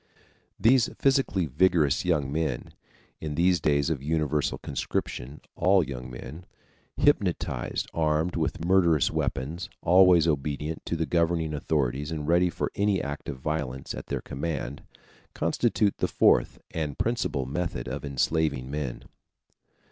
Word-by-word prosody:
These 120 +1 +4
physically 135 -10 +2
vigorous 75 +1 +2
young 75 -6 +1
men 75 -5 -2 0.5
(in 75 -2 -4
these 90 +2 +3
days 70 +1 +2
of 70 -5 -2
universal 75 -1 0
conscription, 70 0 -4
all 95 +1 +4
young 65 -3 -6
men), 75 +7 -9 0.5
hypnotized, - - +1
armed 80 +2 +1
with 80 0 -2
murderous 85 -5 +3
weapons, 85 +9 -3
always 90 -1 +6
obedient 75 +1 -2
to - - -1
the 80 0 0
governing 85 0 +1
authorities 70 -1 -1
and 75 -2 -4
ready 90 +1 +4
for - - -3
any 100 -1 +1
act 70 0 -5
of 70 - -5
violence 65 -2 -3
at - - -7
their - - -3
command, 70 -1 -4 0.5
constitute 100 -2 +1
the - - +1
fourth - - +3
and 75 -4 -3
principal 110 - -1
method 70 -3 -3
of 70 +3 -4
enslaving 70 -1 0
men. 70 -5 -4
80 Hz, 135 wpm, -27 LUFS, 70-85 Hz, 0.5 s, always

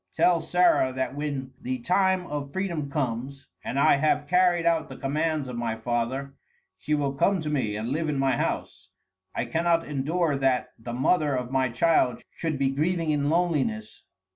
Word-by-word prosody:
Tell 175 -2 +3
Sarah 175 -6 +3
that 130 0 -2
when 140 -2 -4
the 130 +1 -2
time 185 +6 +1
of 145 -3 -5
freedom 170 -6 -2
comes 135 -1 -3 0.2
and 130 - -4
I 140 - +5
have 145 0 +1
carried 180 -1 +3
out 165 -2 +2
the - - -9
commands 150 +1 -1
of 125 - -6
my 115 -1 -2
father, 120 +4 -2 0.5
she 150 +11 0
will 140 -2 -1
come 190 +7 +2
to 150 -1 -3
me 120 -8 -1
and 110 +2 -3
live 155 +2 -1
in 145 - -1
my 135 0 +2
house. - - -3 0.5
I - - -1
cannot 165 0 +1
endure 150 +3 0
that 130 -2 +1
the 120 +1 -6
mother 145 +3 +2
of 125 0 -3
my 130 -1 +1
child 125 +1 +2
should 160 -3 -2
be 135 0 +1
grieving 160 +3 0
in 145 -1 +1
loneliness. 145 -11 0
145 Hz, 180 wpm, -26 LUFS, 130-165 Hz, 0.5 s, I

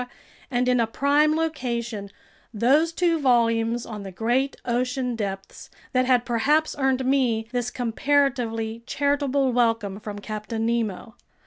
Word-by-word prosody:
and 250 -1 0
in 250 -1 +3
a 230 - +2
prime 290 +5 +2
location, 235 -10 -3 0.4
those 270 +9 +3
two 335 -1 +1
volumes 235 -3 +2
on 215 -3 -7
the 195 -1 -7
great 245 +8 0
ocean 250 +1 -1
depths 195 -3 -6 0.2
that 255 0 +3
had 250 -2 +3
perhaps 290 +7 +1
earned 265 -1 +1
me 250 -5 +1
this 245 -1 -1
comparatively 240 -3 0
charitable 280 -2 +1
welcome 225 -5 +1
from 210 -1 -7
Captain 215 +2 -4
Nemo. 225 -2 -2
245 Hz, 130 wpm, -24 LUFS, 225-270 Hz, 0.4 s, in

